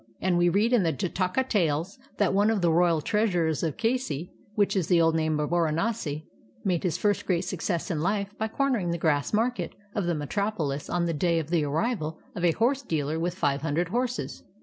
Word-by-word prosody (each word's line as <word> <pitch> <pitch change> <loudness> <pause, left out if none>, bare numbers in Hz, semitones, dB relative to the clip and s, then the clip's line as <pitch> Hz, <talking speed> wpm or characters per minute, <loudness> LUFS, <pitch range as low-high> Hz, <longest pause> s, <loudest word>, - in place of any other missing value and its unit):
And 185 -1 +1
we 175 0 +4
read 210 +7 +2
in 240 - +5
the 165 -3 +2
"Jataka 185 - -1
Tales" 175 - 0 0.2
that 200 -3 +2
one 205 +2 +4
of 220 -3 +1
the 170 - +4
royal 170 -1 +3
treasurers 175 -5 +1
of 160 -3 -2
Kasi, 225 - -1 0.2
which 205 -1 +2
is 185 -5 +1
the 175 -2 +4
old 165 -1 +4
name 155 -1 +1
of 150 +1 -1
Baranasi, 165 -1 0 0.4
made 180 -5 +1
his 175 -3 0
first 205 +1 0
great 175 -3 +2
success 180 0 -2
in 160 - -1
Hfe 200 +4 -1
by 220 - 0
cornering 240 -6 0
the 170 - 0
grass 150 -4 +1
market 235 +4 0 0.2
of 205 - -1
the 175 -1 0
metropolis 150 -2 -2
on 175 -1 0
the 170 - 0
day 170 +2 +1
of 160 0 -3
the 170 -3 +2
arrival 160 - -1 0.2
of 175 - -4
a 170 -2 +4
horse 255 - +1
dealer 155 - -2
with 175 +1 -1
five 145 -6 0
hundred 160 +3 0
horses. 250 +4 -2
175 Hz, 210 wpm, -27 LUFS, 160-210 Hz, 0.4 s, in